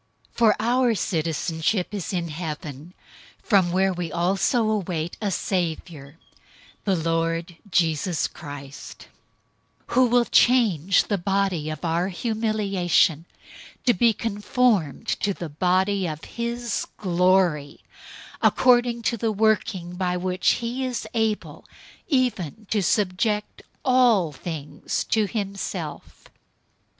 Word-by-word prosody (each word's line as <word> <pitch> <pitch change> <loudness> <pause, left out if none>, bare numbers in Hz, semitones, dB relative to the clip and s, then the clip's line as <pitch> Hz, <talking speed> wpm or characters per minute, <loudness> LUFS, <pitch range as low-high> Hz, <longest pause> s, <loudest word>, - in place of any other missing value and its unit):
003:020 - - -35
For 225 -3 +5
our 240 +1 +2
citizenship 165 +2 -1
is 200 -4 -4
in 175 -3 -2
heaven, 155 0 -6 0.5
from 190 -5 +3
where 190 +1 +2
we 175 -2 -4
also 200 - +1
wait 175 -4 -3
for 210 - -1
a - - +1
Savior, 165 -6 -3 0.7
the 195 -2 +2
Lord 165 +1 -1
Jesus 165 -1 +1
Christ; 145 -3 -10 0.8
003:021 - - -7
who 255 - +5
will 240 0 +3
change 195 - +4
the 205 -3 -2
body 190 -4 0
of 155 +2 -5
our 170 +2 +1
humiliation 195 -6 +1 0.6
to 245 - +5
be 230 +4 +4
conformed 210 - 0
to 200 -2 -1
the 170 - -6
body 185 +4 +1
of 155 -1 -6
his 235 -1 -3
glory, 180 -5 +1 0.6
according 240 -2 +3
to 235 - 0
the 225 0 0
working 210 -4 0
by 180 -1 0
which 185 0 +1
he 240 +3 -3
is 255 -2 -3
able 220 -2 -1 0.4
even 225 - -1
to 210 - +2
subject 210 +2 0 0.2
all 245 - +4
things 150 0 -4
to 215 -2 +1
himself. 195 -7 -5
190 Hz, 120 wpm, -24 LUFS, 165-220 Hz, 0.8 s, For